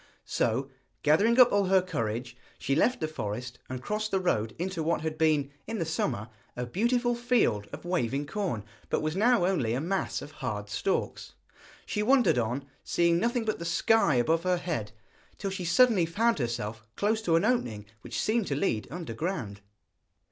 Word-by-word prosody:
So, -, -, 0 dB, 0.4 s
gathering 205 Hz, -, +4 dB
up 250 Hz, -1 st, +8 dB
all 200 Hz, -1 st, +3 dB
her 190 Hz, 0 st, +5 dB
courage, 120 Hz, -6 st, -3 dB, 0.2 s
she 135 Hz, -, -1 dB
left 250 Hz, -, +2 dB
the 155 Hz, -, 0 dB
forest 125 Hz, -3 st, -5 dB
and 130 Hz, 0 st, -5 dB
crossed 215 Hz, +1 st, -2 dB
the 190 Hz, -, +1 dB
road 110 Hz, -, 0 dB
into 180 Hz, 0 st, -3 dB
what 165 Hz, +2 st, 0 dB
had 160 Hz, 0 st, -3 dB
been, 155 Hz, -3 st, +2 dB, 0.2 s
in 225 Hz, -, -3 dB
the 165 Hz, -, -1 dB
summer, 120 Hz, -8 st, -2 dB, 0.3 s
a 125 Hz, -, -3 dB
beautiful 240 Hz, -, +1 dB
field 235 Hz, -, +1 dB
of -, -, -8 dB
waving 145 Hz, -6 st, 0 dB
corn, 165 Hz, -, -3 dB, 0.3 s
but -, -, 0 dB
was 155 Hz, +1 st, -1 dB
now 225 Hz, -1 st, +4 dB
only 140 Hz, -12 st, +1 dB
a -, -, 0 dB
mass 185 Hz, +6 st, -2 dB
of -, -, -10 dB
hard -, -, -4 dB
stalks. -, -, -2 dB, 0.5 s
She 210 Hz, -, -2 dB
wandered 240 Hz, -, +4 dB
on, 120 Hz, +4 st, -2 dB, 0.2 s
seeing 170 Hz, 0 st, +2 dB
nothing 235 Hz, +1 st, 0 dB
but 215 Hz, -, -1 dB
the -, -, -5 dB
sky 170 Hz, -2 st, +3 dB
above 160 Hz, +7 st, +2 dB
her 180 Hz, 0 st, +1 dB
head, 155 Hz, -13 st, -3 dB, 0.5 s
till 195 Hz, -, -3 dB
she 190 Hz, -2 st, -4 dB
suddenly 200 Hz, -1 st, +4 dB
found 225 Hz, +4 st, +1 dB
herself 115 Hz, -3 st, -3 dB
close 215 Hz, +2 st, +1 dB
to 170 Hz, -6 st, +2 dB
an 165 Hz, -, +3 dB
opening 120 Hz, -, 0 dB, 0.2 s
which -, -, -5 dB
seemed 220 Hz, -1 st, +1 dB
to 140 Hz, -, -1 dB
lead 135 Hz, -, 0 dB
underground. 155 Hz, -, -4 dB
170 Hz, 180 wpm, -28 LUFS, -, 0.5 s, up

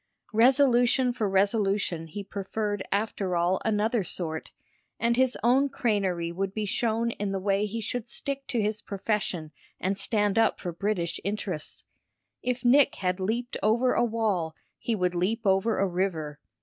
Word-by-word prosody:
Resolution 250 Hz, +1 st, +4 dB
for 220 Hz, -4 st, -1 dB
resolution 195 Hz, -4 st, +1 dB
he 200 Hz, +6 st, -6 dB
preferred 205 Hz, +1 st, -3 dB
after 200 Hz, -3 st, -1 dB
all 175 Hz, +2 st, +1 dB
another 220 Hz, +1 st, +1 dB
sort, 160 Hz, -3 st, -4 dB, 0.5 s
and 235 Hz, 0 st, +2 dB
his 260 Hz, 0 st, +2 dB
own 265 Hz, +4 st, +4 dB
crânerie 190 Hz, -9 st, 0 dB
would 195 Hz, +2 st, -3 dB
be 215 Hz, -1 st, -1 dB
shown 230 Hz, +2 st, 0 dB
in 205 Hz, -3 st, -3 dB
the 195 Hz, -, -1 dB
way 200 Hz, +2 st, +1 dB
he 225 Hz, +3 st, -4 dB
should 230 Hz, +1 st, -4 dB
stick 275 Hz, +2 st, -3 dB
to 240 Hz, -, -1 dB
his 210 Hz, 0 st, -1 dB
profession 195 Hz, -6 st, -2 dB, 0.3 s
and 195 Hz, +2 st, -1 dB
stand 210 Hz, -1 st, +2 dB
up 225 Hz, -, +3 dB
for 180 Hz, -, -4 dB
British 175 Hz, -1 st, -2 dB
interests. 195 Hz, -5 st, -4 dB, 0.6 s
If 250 Hz, 0 st, -2 dB
Nick 270 Hz, +3 st, +5 dB
had 180 Hz, -1 st, -1 dB
leaped 235 Hz, +6 st, -2 dB
over 235 Hz, +4 st, +3 dB
a -, -, +2 dB
wall 210 Hz, -9 st, 0 dB, 0.2 s
he 230 Hz, -, -1 dB
would 180 Hz, -3 st, 0 dB
leap 190 Hz, +6 st, 0 dB
over 195 Hz, +3 st, +2 dB
a 195 Hz, -, +2 dB
river. 170 Hz, -5 st, -2 dB
205 Hz, 160 wpm, -27 LUFS, 190-230 Hz, 0.6 s, Nick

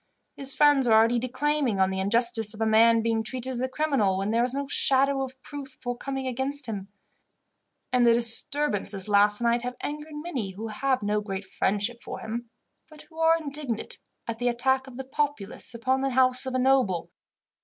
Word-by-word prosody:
His 270 Hz, -1 st, +1 dB
friends 285 Hz, -2 st, +4 dB
are 225 Hz, -, +4 dB
already 230 Hz, +2 st, +4 dB
declaiming 255 Hz, -2 st, -1 dB
on 190 Hz, 0 st, +3 dB
the 190 Hz, -, -3 dB
injustice 225 Hz, +1 st, +3 dB
of 220 Hz, -, -9 dB
a -, -, +2 dB
man 225 Hz, +1 st, +4 dB
being 225 Hz, -1 st, +1 dB
treated 255 Hz, +3 st, -4 dB
as 245 Hz, -1 st, -3 dB
a 260 Hz, -, -1 dB
criminal, 260 Hz, -10 st, +1 dB
when 195 Hz, +2 st, -1 dB
there 230 Hz, +1 st, +2 dB
is 250 Hz, -, 0 dB
no 280 Hz, +2 st, -3 dB
shadow 275 Hz, 0 st, +2 dB
of 260 Hz, 0 st, -6 dB
proof 285 Hz, -2 st, -8 dB
forthcoming 265 Hz, +2 st, -4 dB
against 265 Hz, +3 st, -1 dB
him; 200 Hz, -4 st, -5 dB, 1.1 s
and 250 Hz, -1 st, +4 dB
the 235 Hz, -1 st, +5 dB
disturbances 230 Hz, -4 st, +1 dB
last 205 Hz, +1 st, +3 dB
night 235 Hz, 0 st, +2 dB
have 250 Hz, +1 st, -5 dB
angered 300 Hz, +1 st, -6 dB
many 280 Hz, -, -4 dB
who 220 Hz, +4 st, -6 dB
have 260 Hz, +2 st, -1 dB
no 210 Hz, +1 st, 0 dB
great 195 Hz, -1 st, -5 dB
friendship 205 Hz, +5 st, -1 dB
for -, -, -7 dB
him, 235 Hz, +1 st, -6 dB, 0.4 s
but 305 Hz, -1 st, -14 dB
who 320 Hz, -, -12 dB
are 325 Hz, 0 st, +4 dB
indignant 285 Hz, -7 st, -4 dB, 0.3 s
at 230 Hz, -1 st, -4 dB
the 245 Hz, -, 0 dB
attack 265 Hz, +2 st, 0 dB
of 250 Hz, -2 st, -11 dB
the 265 Hz, -, -6 dB
populace 270 Hz, -5 st, -3 dB
upon 260 Hz, +3 st, 0 dB
the 270 Hz, -, 0 dB
house 255 Hz, 0 st, +2 dB
of 260 Hz, -, -3 dB
a -, -, +2 dB
noble. 255 Hz, -9 st, +1 dB
245 Hz, 195 wpm, -26 LUFS, 220-270 Hz, 1.1 s, the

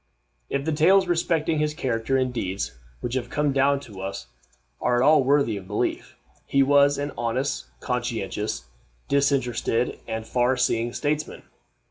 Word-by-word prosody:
If 140 Hz, 0 st, -2 dB
the 160 Hz, -, 0 dB
tales 185 Hz, +6 st, +5 dB
respecting 165 Hz, -2 st, +1 dB
his 150 Hz, 0 st, 0 dB
character 130 Hz, -3 st, 0 dB
and 130 Hz, -1 st, 0 dB
deeds 95 Hz, -, -3 dB, 0.3 s
which 120 Hz, -, -3 dB
have 125 Hz, -2 st, -2 dB
come 145 Hz, 0 st, 0 dB
down 140 Hz, +1 st, +3 dB
to 100 Hz, -8 st, -10 dB
us 100 Hz, +1 st, -5 dB, 0.6 s
are 125 Hz, -, +2 dB
at 120 Hz, +2 st, +3 dB
all 155 Hz, -2 st, +6 dB
worthy 135 Hz, -5 st, +2 dB
of 95 Hz, -2 st, -9 dB
belief, 105 Hz, +2 st, -2 dB, 0.3 s
he 140 Hz, 0 st, +4 dB
was 140 Hz, +1 st, +4 dB
an 145 Hz, +1 st, -3 dB
honest, 125 Hz, +3 st, -1 dB
conscientious, 115 Hz, -, -3 dB, 0.4 s
disinterested, 125 Hz, -4 st, +1 dB
and 110 Hz, 0 st, -4 dB
far 125 Hz, +2 st, +1 dB
seeing 120 Hz, -1 st, +1 dB
statesman. 150 Hz, +3 st, -2 dB
130 Hz, 150 wpm, -25 LUFS, 115-145 Hz, 0.6 s, all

